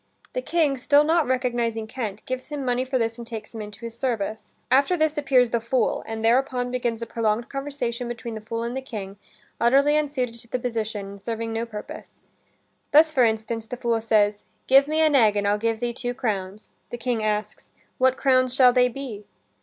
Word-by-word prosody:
The -, -, -1 dB
King, 315 Hz, -, +1 dB
still 285 Hz, +3 st, +4 dB
not 320 Hz, -1 st, +2 dB
recognizing 240 Hz, -3 st, 0 dB
Kent, 220 Hz, -3 st, -5 dB
gives 255 Hz, +2 st, -5 dB
him 290 Hz, -3 st, -4 dB
money 250 Hz, 0 st, +1 dB
for 260 Hz, 0 st, -1 dB
this 230 Hz, 0 st, -1 dB
and 235 Hz, -, -8 dB
takes 220 Hz, -2 st, -7 dB
him 225 Hz, -, -6 dB
into 210 Hz, +1 st, -9 dB
his 230 Hz, -1 st, -7 dB
service. 220 Hz, -4 st, -3 dB, 0.2 s
After 280 Hz, +7 st, +4 dB
this 310 Hz, -1 st, +1 dB
appears 265 Hz, -5 st, +3 dB
the 235 Hz, -, +1 dB
fool, 235 Hz, 0 st, 0 dB
and 225 Hz, 0 st, -3 dB
thereupon 250 Hz, +1 st, +2 dB
begins 240 Hz, -2 st, -2 dB
a -, -, -3 dB
prolonged 230 Hz, 0 st, -1 dB
conversation 275 Hz, -4 st, -3 dB
between 235 Hz, -1 st, -6 dB
the 220 Hz, -, -6 dB
fool 230 Hz, +1 st, -4 dB
and 235 Hz, +2 st, -3 dB
the 265 Hz, -, -2 dB
King, 205 Hz, -6 st, -7 dB, 0.4 s
utterly 275 Hz, +5 st, +4 dB
unsuited 260 Hz, -6 st, -1 dB
to -, -, -14 dB
the 250 Hz, -, -2 dB
position 225 Hz, -4 st, -3 dB
and 200 Hz, 0 st, -11 dB
serving 225 Hz, 0 st, -3 dB
no 230 Hz, +1 st, -2 dB
purpose. 210 Hz, -2 st, -9 dB, 0.7 s
Thus, 310 Hz, +2 st, +6 dB
for 265 Hz, -5 st, +3 dB
instance, 225 Hz, 0 st, -1 dB
the 250 Hz, -, -6 dB
fool 235 Hz, -2 st, 0 dB
says, 210 Hz, -2 st, +2 dB, 0.2 s
"Give 270 Hz, +2 st, +6 dB
me 310 Hz, +1 st, +1 dB
an 310 Hz, -2 st, +4 dB
egg 220 Hz, -5 st, +5 dB
and 200 Hz, 0 st, 0 dB
I'll 205 Hz, +1 st, +2 dB
give 225 Hz, 0 st, 0 dB
thee 240 Hz, 0 st, -2 dB
two 245 Hz, 0 st, -4 dB
crowns." 205 Hz, -4 st, -3 dB, 0.2 s
The 240 Hz, -, -5 dB
King 240 Hz, -1 st, -1 dB
asks, 210 Hz, 0 st, -3 dB, 0.3 s
"What 260 Hz, 0 st, +3 dB
crowns 255 Hz, -2 st, +2 dB
shall 255 Hz, -2 st, +6 dB
they 250 Hz, 0 st, +5 dB
be?" 230 Hz, -5 st, -7 dB
240 Hz, 205 wpm, -24 LUFS, 225-260 Hz, 0.7 s, Thus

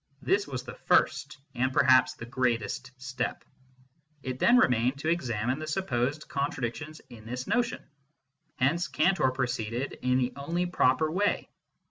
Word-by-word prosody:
This 200 Hz, +1 st, +1 dB
was 130 Hz, -3 st, -5 dB
the -, -, -8 dB
first 140 Hz, +2 st, +1 dB, 0.2 s
and 130 Hz, +1 st, 0 dB
perhaps 130 Hz, -1 st, +4 dB
the 115 Hz, -, -8 dB
greatest 120 Hz, -2 st, -1 dB
step. 125 Hz, -1 st, -4 dB, 0.8 s
It 130 Hz, 0 st, -4 dB
then 240 Hz, +1 st, +5 dB
remained 125 Hz, -, +3 dB
to 155 Hz, +3 st, -2 dB
examine 130 Hz, -5 st, -1 dB
the 155 Hz, -, -5 dB
supposed 145 Hz, -4 st, -1 dB
contradictions 140 Hz, +2 st, -3 dB
in 110 Hz, -2 st, -12 dB
this 125 Hz, +3 st, -5 dB
notion. 240 Hz, +3 st, 0 dB, 0.7 s
Here 135 Hz, +5 st, +3 dB, 0.2 s
Cantor 185 Hz, -8 st, +3 dB
proceeded 125 Hz, -1 st, -3 dB
in 125 Hz, 0 st, +2 dB
the 125 Hz, -1 st, 0 dB
only 165 Hz, +6 st, -2 dB
proper 155 Hz, -3 st, +2 dB
way. 200 Hz, +4 st, 0 dB
130 Hz, 140 wpm, -28 LUFS, 125-155 Hz, 0.8 s, then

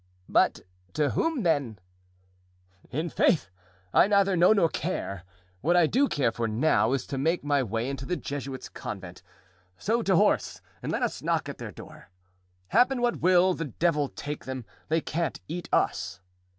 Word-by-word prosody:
"But -, -, +2 dB, 0.3 s
to 145 Hz, +3 st, +1 dB
whom, 325 Hz, -8 st, 0 dB
then?" 140 Hz, -, +1 dB, 1.1 s
"I'faith! 155 Hz, -, +1 dB, 0.4 s
I -, -, +6 dB
neither 200 Hz, -2 st, +3 dB
know 175 Hz, +3 st, +5 dB
nor 195 Hz, -6 st, +4 dB
care. 100 Hz, -, -4 dB, 0.4 s
What 175 Hz, +4 st, +3 dB
I 175 Hz, -, +6 dB
do 265 Hz, -, +2 dB
care 130 Hz, -5 st, +1 dB
for 115 Hz, 0 st, -2 dB
now, 115 Hz, +1 st, +2 dB
is 135 Hz, -2 st, -1 dB
to 135 Hz, -, -4 dB
make 165 Hz, +4 st, +1 dB
my 145 Hz, -1 st, +2 dB
way 115 Hz, 0 st, -2 dB
into 135 Hz, -1 st, -5 dB
the 180 Hz, -, 0 dB
Jesuits' 135 Hz, -2 st, -5 dB
convent; 90 Hz, -3 st, -8 dB, 0.6 s
so 230 Hz, -, 0 dB
to 195 Hz, -4 st, +2 dB
horse -, -, +2 dB, 0.2 s
and -, -, -3 dB
let -, -, -1 dB
us -, -, -2 dB
knock -, -, 0 dB
at -, -, -7 dB
their -, -, -6 dB
door. -, -, -13 dB, 0.6 s
Happen 250 Hz, -, +3 dB
what 240 Hz, 0 st, 0 dB
will, 185 Hz, +1 st, +5 dB
the 165 Hz, -, -4 dB
devil 150 Hz, +1 st, 0 dB
take 150 Hz, 0 st, -6 dB
them, 130 Hz, -3 st, -5 dB, 0.2 s
they 160 Hz, +1 st, +2 dB
can't 165 Hz, +2 st, -2 dB
eat 170 Hz, +2 st, -5 dB
us." -, -, 0 dB
155 Hz, 165 wpm, -27 LUFS, 130-180 Hz, 1.1 s, I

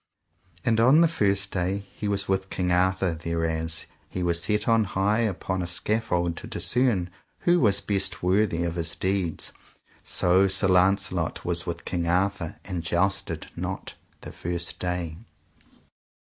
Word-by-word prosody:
And 115 Hz, -1 st, +3 dB
on 130 Hz, +8 st, +6 dB
the 170 Hz, -, +6 dB
first 100 Hz, -, +1 dB
day 95 Hz, +2 st, -1 dB
he 105 Hz, -, -4 dB
was 100 Hz, -1 st, -1 dB
with 95 Hz, 0 st, 0 dB
King 90 Hz, -1 st, -1 dB
Arthur 95 Hz, 0 st, +2 dB
thereas 80 Hz, 0 st, -2 dB, 0.2 s
he 90 Hz, -, -3 dB
was 85 Hz, -1 st, +1 dB
set 105 Hz, +2 st, 0 dB
on 115 Hz, -1 st, +4 dB
high 100 Hz, +3 st, +1 dB
upon 95 Hz, -4 st, -1 dB
a 85 Hz, -, -3 dB
scaffold 90 Hz, -2 st, 0 dB
to -, -, -7 dB
discern 115 Hz, -8 st, +1 dB, 0.3 s
who 175 Hz, 0 st, +4 dB
was 100 Hz, -, +3 dB
best 95 Hz, -3 st, -1 dB
worthy 90 Hz, -2 st, +2 dB
of 85 Hz, -1 st, -1 dB
his 85 Hz, -, 0 dB
deeds. 95 Hz, -3 st, -1 dB, 0.5 s
So 95 Hz, +2 st, +3 dB
Sir 95 Hz, 0 st, +2 dB
Launcelot 90 Hz, -2 st, +2 dB
was 85 Hz, 0 st, -2 dB
with 85 Hz, 0 st, -4 dB
King 85 Hz, -2 st, -2 dB
Arthur, 90 Hz, -1 st, 0 dB
and 90 Hz, -3 st, -3 dB
jousted 90 Hz, +4 st, -1 dB
not -, -, -5 dB, 0.3 s
the -, -, -8 dB
first 85 Hz, 0 st, -3 dB
day. 90 Hz, -3 st, -3 dB
95 Hz, 150 wpm, -26 LUFS, 85-100 Hz, 0.5 s, on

